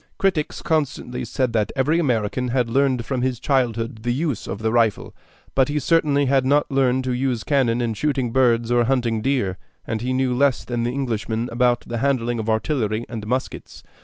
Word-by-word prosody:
Critics 180 Hz, -6 st, -1 dB
constantly 140 Hz, -6 st, -1 dB
said 125 Hz, +1 st, -1 dB
that 110 Hz, -2 st, +1 dB
every 150 Hz, +5 st, +2 dB
American 125 Hz, -4 st, 0 dB
had 120 Hz, -1 st, 0 dB
learned 130 Hz, -2 st, +1 dB
from 130 Hz, 0 st, -2 dB
his 125 Hz, -2 st, -1 dB
childhood 115 Hz, -4 st, -1 dB
the 120 Hz, -, -3 dB
use 140 Hz, -2 st, -2 dB
of 95 Hz, -, -4 dB
the 110 Hz, -, +1 dB
rifle; 115 Hz, -3 st, +1 dB, 0.4 s
but 135 Hz, -1 st, +3 dB
he 150 Hz, -, -1 dB
certainly 150 Hz, -2 st, +2 dB
had 135 Hz, 0 st, +3 dB
not 145 Hz, +3 st, +2 dB
learned 130 Hz, -1 st, +2 dB
to 130 Hz, -1 st, -1 dB
use 125 Hz, -2 st, -1 dB
cannon 125 Hz, -5 st, +1 dB
in 115 Hz, -2 st, -1 dB
shooting 130 Hz, 0 st, -1 dB
birds 120 Hz, -2 st, +2 dB
or 120 Hz, -1 st, +3 dB
hunting 120 Hz, -3 st, 0 dB
deer, 110 Hz, -8 st, 0 dB, 0.3 s
and 110 Hz, -1 st, -3 dB
he 125 Hz, +2 st, -2 dB
knew 130 Hz, -1 st, +1 dB
less 135 Hz, +1 st, +2 dB
than 120 Hz, -1 st, -2 dB
the 120 Hz, +1 st, 0 dB
Englishman 120 Hz, -3 st, -2 dB
about 120 Hz, 0 st, +2 dB
the 120 Hz, -1 st, -5 dB
handling 120 Hz, -3 st, 0 dB
of 110 Hz, 0 st, -3 dB
artillery 110 Hz, -1 st, 0 dB
and 110 Hz, -3 st, -6 dB
muskets. 130 Hz, +3 st, -4 dB
125 Hz, 190 wpm, -22 LUFS, 115-135 Hz, 0.4 s, but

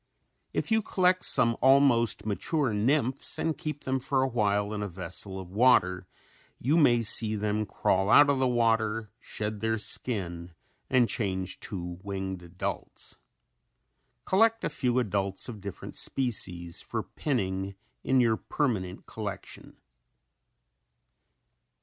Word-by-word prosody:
If -, -, -2 dB
you 220 Hz, 0 st, +4 dB
collect 185 Hz, -2 st, +2 dB
some 115 Hz, -1 st, +3 dB
almost 130 Hz, -5 st, +4 dB
mature 125 Hz, +4 st, 0 dB
nymphs 130 Hz, +5 st, 0 dB
and 160 Hz, -1 st, -1 dB
keep 155 Hz, -4 st, -6 dB
them 130 Hz, 0 st, -1 dB
for 130 Hz, 0 st, +1 dB
a 135 Hz, -, -3 dB
time 105 Hz, -2 st, +1 dB
in 105 Hz, -1 st, -3 dB
a 105 Hz, -, -2 dB
vessel 95 Hz, +1 st, -5 dB
of 90 Hz, -2 st, -9 dB
water 95 Hz, -5 st, +3 dB, 0.5 s
you 140 Hz, +6 st, +1 dB
may 120 Hz, -8 st, +4 dB
see 110 Hz, 0 st, +3 dB
them 105 Hz, 0 st, -1 dB
crawl 95 Hz, +1 st, +1 dB
out 145 Hz, +5 st, +7 dB
of 140 Hz, -2 st, +2 dB
the 130 Hz, -, +2 dB
water, 115 Hz, -3 st, +1 dB
shed 105 Hz, 0 st, -5 dB
their 110 Hz, +1 st, 0 dB
skin 90 Hz, -6 st, -3 dB, 0.4 s
and 125 Hz, -2 st, +4 dB
change 95 Hz, -5 st, -2 dB
to 90 Hz, -3 st, -6 dB
winged 95 Hz, -2 st, -4 dB
adults. 85 Hz, +1 st, -6 dB, 1.1 s
Collect 225 Hz, +4 st, +3 dB
a -, -, 0 dB
few 130 Hz, -5 st, -1 dB
adults 100 Hz, -5 st, -1 dB
of 110 Hz, -5 st, -8 dB
different 100 Hz, -2 st, -8 dB
species 90 Hz, -9 st, -1 dB
for -, -, -4 dB
pinning 95 Hz, -8 st, -2 dB, 0.3 s
in 130 Hz, 0 st, +3 dB
your 115 Hz, -3 st, +3 dB
permanent 105 Hz, -12 st, -2 dB
collection. 100 Hz, -3 st, -7 dB
110 Hz, 130 wpm, -28 LUFS, 95-130 Hz, 1.1 s, out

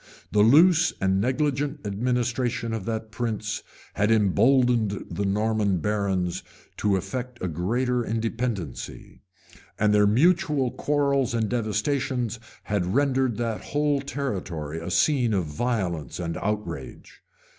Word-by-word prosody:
The 105 Hz, -, +2 dB
loose 165 Hz, -, +6 dB
and 95 Hz, 0 st, +2 dB
negligent 140 Hz, +2 st, -1 dB
administration 120 Hz, +2 st, -1 dB
of 110 Hz, -4 st, -4 dB
that 110 Hz, -1 st, -4 dB
prince 110 Hz, -2 st, -3 dB, 0.3 s
had 105 Hz, +1 st, +1 dB
imboldened 115 Hz, 0 st, +3 dB
the 100 Hz, -, -1 dB
Norman 105 Hz, -1 st, +1 dB
barons 95 Hz, -2 st, -1 dB, 0.4 s
to 105 Hz, -2 st, +2 dB
affect 125 Hz, +5 st, -5 dB
a 95 Hz, -, -2 dB
great 95 Hz, +10 st, -1 dB
independency; 115 Hz, -, -3 dB, 0.6 s
and 105 Hz, 0 st, +3 dB
their 105 Hz, -1 st, +5 dB
mutual 150 Hz, -, +3 dB
quarrels 140 Hz, -4 st, +1 dB
and 110 Hz, -2 st, +1 dB
devastations 120 Hz, +1 st, -1 dB, 0.2 s
had 95 Hz, -1 st, -1 dB
rendered 135 Hz, -4 st, +2 dB
that 115 Hz, -2 st, -2 dB
whole 145 Hz, -1 st, 0 dB
territory 95 Hz, -, -4 dB
a 85 Hz, +2 st, -6 dB
scene 125 Hz, +1 st, +2 dB
of 90 Hz, -3 st, 0 dB
violence 85 Hz, -, -2 dB
and 85 Hz, -1 st, -3 dB
outrage. 100 Hz, -10 st, -5 dB
115 Hz, 120 wpm, -25 LUFS, 100-130 Hz, 0.6 s, loose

